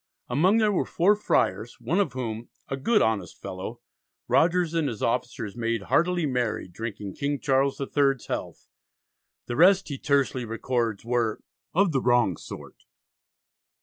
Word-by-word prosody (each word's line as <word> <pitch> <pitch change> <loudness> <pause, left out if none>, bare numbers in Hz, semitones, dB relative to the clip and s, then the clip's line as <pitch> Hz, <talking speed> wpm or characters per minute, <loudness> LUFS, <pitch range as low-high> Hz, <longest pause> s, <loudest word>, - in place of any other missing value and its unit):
Among 175 - +3
them 215 -2 +3
were 180 - +2
four 195 +5 +3
friars, 120 - 0
one 175 +5 0
of 160 - +1
whom, 115 -3 -5 0.2
"a - - -1
good 210 - +2
honest 100 -6 -1
fellow," - - -7 0.5
Rogers 170 0 +3
and 165 -3 +1
his 110 -4 -6
officers 115 -3 -2
made 115 -2 -1
"heartily 175 0 +3
merry, 125 -8 -1
drinking 100 +1 -6
King 140 0 -2
Charles 135 -1 +1
III's 135 -2 +1
health": - - -5 0.8
the 120 - -4
rest 190 +5 +5
he 140 -2 -5
tersely 140 -3 +1
records 115 -1 -2
"were 120 -2 0 0.3
of 195 0 +4
the 135 -3 +1
wrong 120 -7 +3
sort." - - -11
130 Hz, 150 wpm, -26 LUFS, 115-165 Hz, 0.8 s, rest